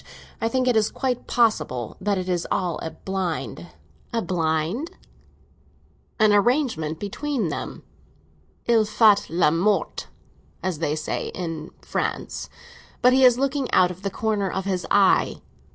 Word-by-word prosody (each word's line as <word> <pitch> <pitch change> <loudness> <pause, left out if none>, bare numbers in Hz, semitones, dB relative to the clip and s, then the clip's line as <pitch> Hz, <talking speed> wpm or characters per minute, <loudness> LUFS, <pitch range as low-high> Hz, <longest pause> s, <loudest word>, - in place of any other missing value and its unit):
I 225 - +2
think 255 +1 0
it 250 - +3
is 220 -1 +3
quite 255 -2 -2
possible 210 - +1
that 200 0 +1
it 185 0 -3
is 175 -2 -1
all 175 -4 -1
a 160 - -3
blind." 160 - -4 0.4
"A 230 -1 -1
blind?" 170 - -1 1.3
"An 215 -2 +5
arrangement 205 - +1
between 225 - -2
them. - - -5 0.8
Il 230 -2 +4
fait 210 -1 +4
le 165 -2 +3
mort, 185 +2 0 0.6
as 180 -4 -2
they 155 -2 0
say 155 - -3
in 165 -3 -5
France; - - -3 0.5
but 250 +1 +6
he 265 0 +4
is 250 -2 +7
looking 275 0 -1
out 180 -1 +4
of 180 +1 -10
the 200 - -2
corner 205 -1 -1
of 190 +1 -3
his 185 -2 -2
eye. 200 -2 +3
195 Hz, 145 wpm, -24 LUFS, 170-230 Hz, 1.3 s, is